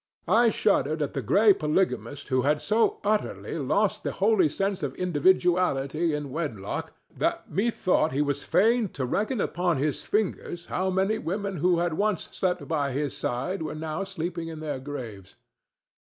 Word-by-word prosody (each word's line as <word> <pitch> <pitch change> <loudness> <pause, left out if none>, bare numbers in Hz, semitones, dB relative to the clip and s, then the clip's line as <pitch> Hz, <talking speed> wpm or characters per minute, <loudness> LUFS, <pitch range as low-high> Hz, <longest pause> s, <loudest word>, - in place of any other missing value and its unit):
I 235 +1 +5
shuddered 160 -8 +1
at 145 - -4
the 135 - -2
gray 205 - +5
polygamist 150 -4 -1
who 130 -1 +2
had 145 +3 +2
so 220 +6 +1
utterly 210 +1 -1
lost - - +1
the - - -3
holy 395 -8 +3
sense 195 -1 -1
of 140 -3 -3
individuality 170 -3 +2
in 145 -2 -5
wedlock 125 -11 -4 0.2
that - - -1
methought 185 -4 +1
he 140 +3 +1
was 145 -1 -1
fain 225 +1 +3
to 130 - -2
reckon 215 - -1
upon 175 -3 0
his 145 +1 -1
fingers 185 -4 -2
how 185 +1 -1
many 190 +4 +1
women 195 +3 -3
who 175 +2 +3
had 170 -1 0
once 205 +1 -1
slept 185 -2 -1
by 145 -5 0
his 145 0 -2
side 150 +11 -2
were 155 -1 -4
now 155 +3 -3
sleeping 175 -3 -4
in 160 -1 -7
their 150 -4 -4
graves. 120 -9 -8
170 Hz, 165 wpm, -26 LUFS, 145-195 Hz, 0.2 s, I